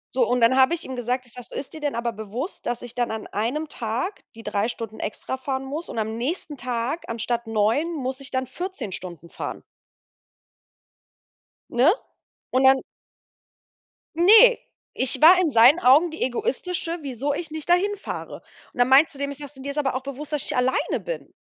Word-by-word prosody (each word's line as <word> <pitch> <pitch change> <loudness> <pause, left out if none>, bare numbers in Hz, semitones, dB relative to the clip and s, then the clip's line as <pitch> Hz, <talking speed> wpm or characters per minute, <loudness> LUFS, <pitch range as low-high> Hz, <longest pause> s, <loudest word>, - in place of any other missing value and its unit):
So, 485 - +3
und 245 -1 +1
dann 230 +3 +5
habe 265 +5 +5
ich 340 - -7
ihm 260 - -6
gesagt 250 +1 -2
ich 240 - -10
sage: 250 -1 -9
„So, - - -11
ist 275 - -5
dir 315 - -7
denn 290 -4 -1
aber 235 0 -1
bewusst, 225 - -6
dass 240 0 -2
ich 245 - -7
dann 245 -1 -1
an 220 -1 -5
einem 255 +9 -2
Tag 245 - -4
die 225 - -11
3 210 0 0
Stunden 230 -2 -6
extra 220 +5 -4
fahren 265 0 -3
muss 300 +5 -5
und - - -7
am 220 +1 -2
nächsten 295 +4 -3
Tag 250 +5 -3
anstatt 235 +1 -2
9 225 +10 +1
muss 265 -2 -3
ich 275 - -6
dann 260 0 -1
14 350 - -6
Stunden 170 -2 -6
fahren“ - - -6 2.1
Ne? 245 +4 +3 0.6
Und 260 +1 +2
dann 265 0 +6 1.4
Ne, 445 +8 +7 0.3
ich 260 +2 0
war 360 +3 +9
in 330 - +2
seinen 245 +7 +7
Augen 310 +3 +5
die 320 - -9
Egoistische, 335 +7 -1
wieso 275 0 -2
ich 325 +2 -4
nicht 310 -1 -5
dahin 390 +4 +3
fahre. - - -7 0.3
Und - - -21
dann 245 - +5
meinst 275 +4 +5
du 275 - -10
dem, 280 0 -2
ich 280 - -7
sage 285 -2 -8
so: 275 - -10
„Du, 265 - -9
dir 280 - -3
ist 280 - -8
aber 270 -3 0
auch 260 - -3
bewusst, 280 +2 -7
dass 300 -3 -1
ich - - -2
nicht - - -2
alleine 250 +1 +1
bin. - - -7
265 Hz, 205 wpm, -24 LUFS, 235-305 Hz, 2.1 s, war